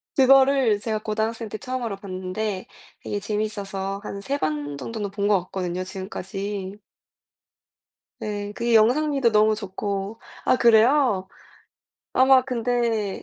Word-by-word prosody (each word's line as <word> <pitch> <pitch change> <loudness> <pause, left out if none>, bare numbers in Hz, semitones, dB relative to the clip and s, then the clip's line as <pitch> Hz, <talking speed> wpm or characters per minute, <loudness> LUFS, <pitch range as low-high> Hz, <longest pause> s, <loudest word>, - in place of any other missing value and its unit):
그거를 265 -4 +5
제가 215 0 -2
고등학생 220 +1 -2
때 215 - -5
처음으로 245 -3 -4
봤는데 190 +1 -4 0.3
되게 205 - -3
재밌어서 200 -2 -3
한 200 - -6
3 280 +6 -2
번 145 - -2
정도는 205 - -4
본 200 0 -1
것 205 -3 +4
같거든요 185 -1 -3
지금까지. 195 +1 -5 1.4
네. 205 -1 -4
그게 235 +1 +1
영상미도 260 +2 +3
너무 215 0 +4
좋고 200 +1 -4 0.3
아 - - +4
그래요? 235 -3 +4 0.9
아마 260 0 +6
근데 235 -4 -1
210 Hz, 260 characters per minute, -24 LUFS, 195-235 Hz, 1.4 s, 아마